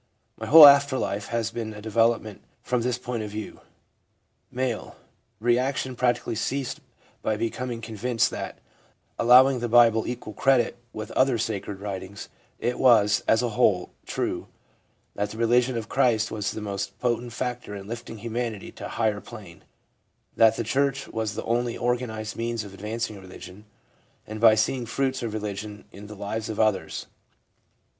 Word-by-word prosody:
My -, -, -7 dB
whole 160 Hz, +1 st, +11 dB
after 140 Hz, -1 st, +7 dB
life 100 Hz, -3 st, -2 dB
has 115 Hz, -1 st, -2 dB
been 115 Hz, -2 st, -5 dB
a -, -, -8 dB
development 115 Hz, -1 st, +1 dB, 0.2 s
from 125 Hz, -1 st, 0 dB
this 125 Hz, +1 st, -1 dB
point 125 Hz, -2 st, -4 dB
of 105 Hz, -, -5 dB
view. 105 Hz, 0 st, -7 dB, 0.9 s
1 125 Hz, -, -9 dB
M. 120 Hz, -4 st, -4 dB, 0.2 s
' -, -, -44 dB
Re 120 Hz, +2 st, +3 dB
action 130 Hz, 0 st, -2 dB
practically 120 Hz, -1 st, 0 dB
ceased 130 Hz, +4 st, -2 dB, 0.4 s
by 110 Hz, -, 0 dB
my -, -, -3 dB
becoming 115 Hz, +1 st, -3 dB
convinced 115 Hz, +1 st, 0 dB
that, -, -, -6 dB, 0.6 s
allowing 125 Hz, +2 st, +6 dB
the 120 Hz, 0 st, -3 dB
Bible 115 Hz, -1 st, +5 dB
equal 120 Hz, -3 st, -5 dB
credit 135 Hz, +1 st, +2 dB
with 110 Hz, 0 st, -7 dB
other 130 Hz, -2 st, +2 dB
sacred 105 Hz, -3 st, -4 dB
writings, 100 Hz, 0 st, -6 dB, 0.3 s
it 120 Hz, +1 st, -2 dB
was, 110 Hz, -5 st, +5 dB
as 115 Hz, +2 st, +3 dB
a 120 Hz, -, 0 dB
whole, 105 Hz, -6 st, +2 dB, 0.2 s
true; -, -, -3 dB, 0.7 s
that 105 Hz, 0 st, -2 dB
the 110 Hz, -, -9 dB
religion 120 Hz, +2 st, +2 dB
of 115 Hz, -1 st, -4 dB
Christ 115 Hz, -5 st, +2 dB
was 105 Hz, -2 st, -2 dB
the 110 Hz, -, -5 dB
most 100 Hz, -1 st, -4 dB
potent 120 Hz, 0 st, -1 dB
factor 125 Hz, -3 st, -4 dB
in 100 Hz, -1 st, -8 dB
lifting 115 Hz, 0 st, -7 dB
humanity 115 Hz, -1 st, -4 dB
to -, -, -8 dB
a -, -, -9 dB
higher 110 Hz, -3 st, +1 dB
plane; 100 Hz, -8 st, -12 dB, 0.7 s
that 115 Hz, 0 st, +5 dB
the 115 Hz, -, -2 dB
church 135 Hz, +3 st, 0 dB
was 110 Hz, -1 st, -3 dB
the -, -, -4 dB
only 120 Hz, +1 st, -1 dB
organised 120 Hz, -3 st, -2 dB
means 115 Hz, -1 st, -2 dB
of 100 Hz, -2 st, -11 dB
advancing 105 Hz, +1 st, -4 dB
religion; 95 Hz, +2 st, -12 dB, 0.6 s
and 110 Hz, 0 st, -7 dB
by 110 Hz, -2 st, +7 dB
seeing 120 Hz, +3 st, 0 dB
fruits 130 Hz, +1 st, -1 dB
of 115 Hz, -2 st, -4 dB
religion 105 Hz, 0 st, -5 dB
in 100 Hz, +1 st, -11 dB
the 105 Hz, -, -9 dB
lives 105 Hz, +2 st, -4 dB
of 110 Hz, -, -5 dB
others/ 110 Hz, -3 st, 0 dB
M. -, -, -36 dB
115 Hz, 170 wpm, -25 LUFS, 105-125 Hz, 0.9 s, whole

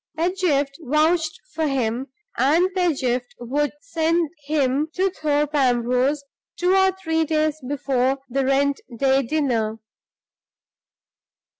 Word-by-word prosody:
Pedgift 320 Hz, -5 st, 0 dB
vouched 315 Hz, +3 st, +1 dB
for 320 Hz, -1 st, 0 dB
him, 255 Hz, -1 st, -1 dB, 0.3 s
and 335 Hz, +7 st, +3 dB
Pedgift 265 Hz, -9 st, 0 dB
would 280 Hz, +4 st, -1 dB
send 330 Hz, -3 st, 0 dB, 0.2 s
him 290 Hz, -1 st, +1 dB
to 380 Hz, +1 st, +1 dB
Thorpe 300 Hz, -3 st, 0 dB
Ambrose 255 Hz, +1 st, +2 dB, 0.3 s
two 360 Hz, +1 st, +2 dB
or 380 Hz, 0 st, +4 dB
three 325 Hz, -4 st, -1 dB
days 310 Hz, -1 st, 0 dB
before 270 Hz, -2 st, 0 dB
the 270 Hz, +2 st, -1 dB
rent 275 Hz, +1 st, +1 dB, 0.2 s
day 270 Hz, +2 st, +3 dB
dinner. 235 Hz, -6 st, -1 dB
290 Hz, 110 wpm, -22 LUFS, 265-320 Hz, 0.3 s, or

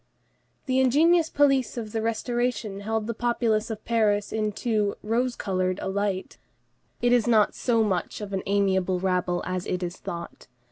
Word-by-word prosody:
The 260 Hz, -1 st, +1 dB
ingenuous 315 Hz, +6 st, +4 dB
police 275 Hz, -5 st, +2 dB
of 220 Hz, -3 st, -5 dB
the 225 Hz, -, -2 dB
Restoration 230 Hz, -1 st, -1 dB
beheld 220 Hz, +1 st, -2 dB
the 230 Hz, -, -2 dB
populace 230 Hz, -2 st, 0 dB
of 220 Hz, -1 st, -6 dB
Paris 210 Hz, -3 st, +1 dB
in 215 Hz, -1 st, 0 dB
too 210 Hz, -2 st, 0 dB
"rose 240 Hz, +3 st, 0 dB
colored" 185 Hz, -2 st, -1 dB
a -, -, -3 dB
light; 195 Hz, -1 st, -2 dB, 0.6 s
it 245 Hz, -, +4 dB
is 240 Hz, -2 st, +3 dB
not 220 Hz, -3 st, +4 dB
so 230 Hz, -3 st, +1 dB
much 190 Hz, -5 st, -2 dB
of 205 Hz, -2 st, -6 dB
"an 190 Hz, -, -1 dB
amiable 190 Hz, -2 st, +1 dB
rabble" 180 Hz, -1 st, 0 dB
as 185 Hz, 0 st, -3 dB
it 180 Hz, 0 st, -2 dB
is 175 Hz, 0 st, -4 dB
thought. 170 Hz, 0 st, -7 dB
215 Hz, 170 wpm, -26 LUFS, 190-240 Hz, 0.6 s, ingenuous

